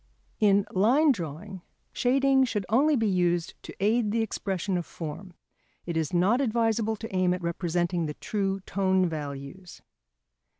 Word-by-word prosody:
] - - -39
In 200 0 +3
Line 255 +11 +4
Drawing 180 - -6 0.3
shading 270 +1 +3
should 210 -5 -2
only 285 +7 +3
be 225 -4 +1
used 175 -3 +1
to - - -10
aid 215 +3 +2
the 225 +2 +1
expression 195 -3 -3
of 175 - -1
form. 170 +3 -8 0.5
It 170 - -4
is 160 -2 -1
not 190 +9 +2
advisable 225 -2 +1
to 220 -2 -7
aim 180 -1 +2
at 180 - -8
representing 175 0 -1
the 150 - -5
true 195 -2 -2
tone 190 -1 +1
values. 150 +3 -7
190 Hz, 155 wpm, -27 LUFS, 175-225 Hz, 0.5 s, Line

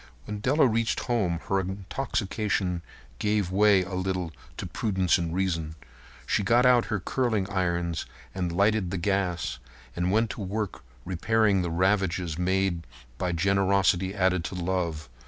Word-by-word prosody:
When 105 -1 -5
Della 135 +6 +3
reached 115 0 0
home 95 -9 0
her 95 - +2
intoxication 95 -1 -2 0.4
gave 105 -3 0
way 100 -1 +5
a 95 +1 -8
little 90 -2 -2 0.3
to - - -4
prudence 95 -5 +1
and 85 -1 -2
reason. 85 -4 -1 0.5
She - - +1
got 120 +5 +4
out 125 -2 +5
her 105 - -1
curling 110 -1 0
irons 85 -3 -1 0.3
and 90 -2 -2
lighted 100 +1 +2
the 95 - -2
gas 90 -6 -1 0.4
and 90 +1 0
went 110 +2 +2
to - - -7
work 100 +1 -3 0.2
repairing 100 +2 +2
the 90 - -2
ravages 90 -1 +1
made 95 -2 0 0.3
by 90 -1 0
generosity 95 +1 +2
added 90 -2 +2
to - - -4
love. 85 -4 -2
95 Hz, 145 wpm, -27 LUFS, 90-105 Hz, 0.5 s, way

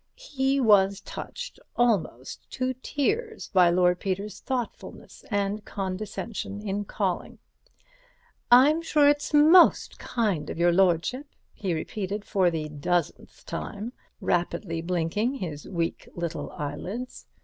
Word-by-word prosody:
He 275 - 0
was 200 -5 +4
touched - - -7 0.2
almost 200 - 0
to 260 0 -1
tears 440 - -2
by 180 -2 +6
Lord 180 0 +3
Peter's 200 +2 -3
thoughtfulness 250 -4 -5
and 205 0 -1
condescension 200 +2 -5
in 205 0 -3
calling. 190 -3 -2 1.1
"I'm 280 +7 +6
sure 300 -3 +3
it's 290 0 +2
most 310 +4 +6
kind 210 -10 -1
of - - -5
your 175 +1 +4
lordship," 190 - +2 0.3
he 185 -5 -2
repeated 200 +5 -4
for 185 -3 +2
the 160 -2 -3
dozenth 155 +3 -3
time, 215 +4 -5 0.3
rapidly 170 -1 -1
blinking 180 +8 -1
his 160 - -6
weak 170 -3 -3
little 170 -1 -4
eyelids. 185 - -6
200 Hz, 115 wpm, -26 LUFS, 175-255 Hz, 1.1 s, by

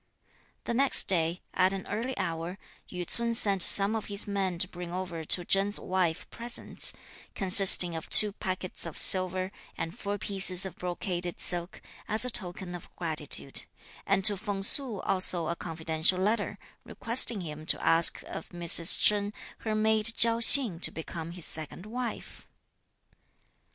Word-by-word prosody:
The - - -5
next 270 +3 +4
day, 170 -1 +1
at 185 +1 0
an 195 - -8
early 240 +5 -6
hour, 170 0 -6 0.3
Yü 180 -1 -6
ts'un 235 0 -3
sent 200 -4 0
some 200 +4 +6
of 220 - -6
his 205 0 0
men 195 -3 -4
to 185 - 0
bring 175 -1 -10
over 175 -2 -7
to 175 +3 +3
Chen's 195 +3 0
wife 180 -3 -4
presents, 235 0 -1 0.4
consisting 185 -3 +6
of 160 - -9
two 210 -1 +6
packets 185 -3 -7
of 165 - -11
silver, 185 0 +2 0.3
and 165 +1 -7
four 205 0 -6
pieces 190 -2 0
of 190 - -9
brocaded 175 0 -5
silk, 175 0 -1 0.2
as 220 +2 +1
a 250 - 0
token 180 -2 -3
of 175 - -11
gratitude, 155 -5 -1 0.4
and 190 - -1
to 205 - +3
Feng 200 -1 -6
Su 230 -2 +5
also 185 -3 +1
a 170 - -4
confidential 160 +1 -3
letter, 210 +5 -3 0.3
requesting 230 -3 0
him 155 -2 -10
to - - +1
ask 165 0 +3
of - - -11
Mrs. 170 -1 +4
Chen 205 -1 0 0.3
her 220 -1 -5
maid 215 0 0
Chiao 230 0 +2
Hsing 235 -7 +4
to - - +1
become 160 0 -9
his 175 -2 -7
second 160 +4 -5
wife. 235 +1 -9
185 Hz, 155 wpm, -26 LUFS, 175-210 Hz, 0.4 s, some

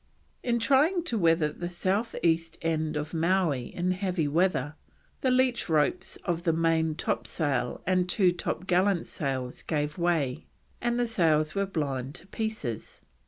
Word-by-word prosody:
In 240 -1 +1
trying 285 +9 +3
to 245 -9 -1
weather 165 -3 +3
the 175 +2 -5
south 195 +6 -1
east 165 0 +1
end 160 -1 0
of 150 +2 -4
Mowee 165 -6 +1
in 180 +1 -1
heavy 185 -4 -1
weather, 150 -2 +1 0.5
the 260 - +2
leach 255 -5 +2
ropes 155 +2 +1
of 170 -2 0
the 170 -1 +2
main 160 -1 +1
topsail 140 -6 -1
and 180 0 +1
two 185 -1 +4
topgallant 180 +1 0
sails 130 -4 -3
gave 150 0 -2
way, 160 -5 0 0.3
and 240 0 0
the 245 - +2
sails 160 -8 +2
were 200 0 0
blown 140 -7 -2
to - - -11
pieces. 205 - -4
170 Hz, 150 wpm, -28 LUFS, 150-190 Hz, 0.5 s, two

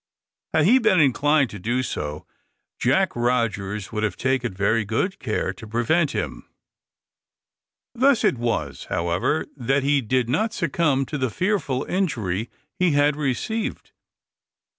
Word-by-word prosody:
Had 155 -1 +4
he 245 +8 +6
been 215 -7 +3
inclined 145 0 +3
to 105 - -8
do 120 +7 -1
so, 75 -9 -4 0.5
Jack - - +2
Rogers 110 -5 -1
would 105 -1 -2
have 105 -4 -1
taken 130 -3 0
very 100 +4 +1
good 115 - -1
care 105 -5 -2
to 110 +4 -11
prevent 120 +9 +1
him. - - -5 1.4
Thus 255 0 +3
it 125 - +2
was, 120 -1 -2
however, 85 - 0
that 135 +1 0
he 140 0 +3
did 125 +1 0
not 215 - 0
succumb 155 - +1
to 150 - -4
the 130 -1 0
fearful 150 - -1
injury 115 - -1 0.3
he 180 -4 +3
had 145 0 +3
received. 150 - -3
130 Hz, 140 wpm, -23 LUFS, 110-155 Hz, 1.4 s, he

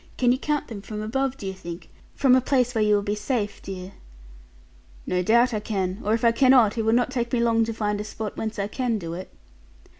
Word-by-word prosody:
Can 245 -1 +3
you 255 - +1
count 295 0 -1
them, 215 -4 -7
from 210 +1 -7
above, 265 +4 -1
do 200 - -8
you 190 - -3
think? 175 -2 -9 0.2
From 265 -3 +4
a 260 - +4
place 250 -1 +1
where 220 -2 +2
you 210 0 +4
will 205 - 0
be 205 - -1
safe, 210 0 -2
dear' 185 -1 -7 1.1
'No 180 - 0
doubt, 235 +6 +3
I 215 - 0
can; 195 -2 -2
or 215 +2 +2
if 230 +1 -1
I 230 - +6
cannot, 250 -3 +5
it 230 - 0
will 220 - +3
not 245 +1 +2
take 240 -2 -2
me 250 - +1
long 230 -1 +3
to 225 - -3
find 210 -2 -2
a - - -4
spot, 215 0 -6
whence 220 0 -4
I 200 0 -1
can 240 0 -1
do 165 -4 -6
it.' 185 +2 -7
220 Hz, 245 wpm, -24 LUFS, 205-245 Hz, 1.1 s, I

